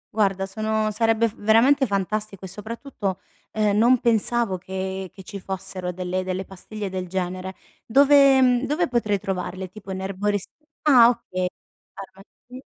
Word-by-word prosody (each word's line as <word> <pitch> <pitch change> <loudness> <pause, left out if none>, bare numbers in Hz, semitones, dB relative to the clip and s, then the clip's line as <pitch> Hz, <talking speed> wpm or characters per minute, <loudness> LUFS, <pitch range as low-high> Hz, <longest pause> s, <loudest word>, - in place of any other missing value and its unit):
Guarda, 195 -3 +1
sono 215 +2 -1
sarebbe 225 +1 +2
f 215 - -8
veramente 250 +6 +4
fantastico 200 0 -2
e - - -6
soprattutto, 210 0 -5 0.3
uhm, 210 -2 +1
non 240 +4 +4
pensavo 230 -3 +1
che 190 +1 -5
che 190 - -13
ci 200 +2 -8
fossero 185 -1 -5
delle 185 +1 -3
delle 185 +1 -3
pastiglie 200 +3 -7
del 185 -1 -4
genere 185 +1 -4 0.3
dove, 275 +2 +6
mhmm, 250 0 +3
dove 330 +4 +1
potrei 230 -5 0
trovarle 190 -1 -4
tipo 195 0 -10
in 190 0 -4
erborist 195 +1 -2 0.3
ah 255 -6 +7
ok. 185 -6 -2 0.5
Farmaci 200 +7 -13
205 Hz, 145 wpm, -23 LUFS, 190-230 Hz, 0.5 s, ah